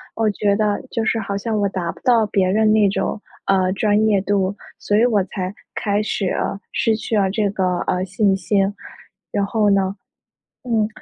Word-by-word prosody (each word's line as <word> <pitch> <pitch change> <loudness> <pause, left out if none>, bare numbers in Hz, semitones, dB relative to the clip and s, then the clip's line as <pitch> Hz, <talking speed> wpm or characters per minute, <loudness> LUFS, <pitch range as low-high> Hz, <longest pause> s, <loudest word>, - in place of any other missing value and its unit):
我 225 -1 +1
觉 200 0 +1
得， 210 +3 0
就 230 - -2
是 225 - +1
好 200 -2 -3
像 215 +1 -2
我 200 - +2
达 180 -3 -3
不 - - -16
到 235 -3 +4
别 195 -2 +1
人 215 +2 +3
那 215 -2 +4
种， 205 +2 -2 0.3
呃， 190 -1 +3
专 210 +1 +2
业 205 -2 +3
度， 200 0 0 0.2
所 205 - +1
以 230 - +5
我 220 -5 +3
才 185 0 -4 0.2
开 205 0 0
始， 210 -2 -2
呃， 195 - -2
失 225 -2 +1
去 215 0 -2
了 195 -2 +2
这 205 +1 0
个， 185 -3 0
呃， 180 - 0
信 200 +1 +1
心。 195 +1 0 0.6
然 200 - 0
后 210 0 +1
呢 195 -1 +2 0.7
嗯， 225 -4 +1
205 Hz, 205 characters per minute, -20 LUFS, 195-215 Hz, 0.7 s, 以